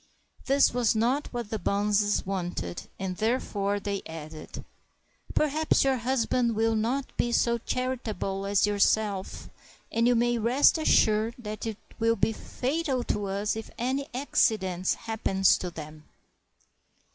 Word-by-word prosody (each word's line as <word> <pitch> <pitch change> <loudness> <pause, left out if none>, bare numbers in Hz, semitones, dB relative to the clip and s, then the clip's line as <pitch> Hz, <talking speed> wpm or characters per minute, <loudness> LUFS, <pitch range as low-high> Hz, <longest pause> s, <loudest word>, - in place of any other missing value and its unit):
This 275 -1 +4
was 240 -2 +2
not 245 +6 +1
what 240 -4 -5
the 220 - -2
bonzes 205 +1 +1
wanted, 175 - -4
and 185 -1 -4
therefore 205 -3 0
they 200 -1 -3
added, 155 -1 -9 0.3
— - - -18
"Perhaps 305 +1 +2
your 270 -1 +2
husband 240 -1 0
will 225 +1 +2
not 245 +5 -1
be 240 - +1
so 235 0 +2
charitable 220 -6 -3
as 200 0 +3
yourself, 205 -1 0 0.4
and 230 +1 +2
you 245 - +4
may 240 0 +2
rest 250 +8 +4
assured 220 -6 +3
that 215 -2 -6
it 220 -2 -4 0.2
will 230 0 +3
be 225 - +1
fatal 265 +2 -2
to 205 -3 -2
us 200 +2 -1
if 220 -1 -6
any 265 +4 -2
accident 190 -8 +1
happens 205 -4 +2
to 180 - -4
them." 155 -2 -10
220 Hz, 140 wpm, -27 LUFS, 200-245 Hz, 0.4 s, This